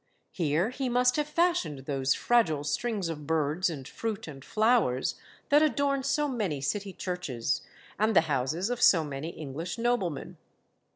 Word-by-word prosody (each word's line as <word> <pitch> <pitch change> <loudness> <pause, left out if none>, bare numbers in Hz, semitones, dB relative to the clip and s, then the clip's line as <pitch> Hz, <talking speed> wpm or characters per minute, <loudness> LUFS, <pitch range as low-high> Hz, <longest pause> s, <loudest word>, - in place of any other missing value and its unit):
Here 170 +5 0
he 260 0 -2
must 250 +1 +3
have 300 -1 0
fashioned 300 - 0
those 135 -2 +1
fragile 170 -12 +2
strings 195 +6 -1
of 150 -3 -6
birds 160 +3 +1
and 140 -5 -6
fruit 225 +1 -4
and 135 -3 -9
flowers 215 - +2 0.4
that 295 +1 +6
adorn 285 -2 +2
so 275 +2 +1
many 210 - -2
city 200 +8 -2
churches, 140 -11 -2 0.4
and 215 0 +2
the - - +8
houses 155 - -1
of 245 0 -3
so 165 -9 +6
many 145 +1 -5
English 160 - -6
noblemen. 230 - -1
180 Hz, 155 wpm, -29 LUFS, 145-240 Hz, 0.4 s, the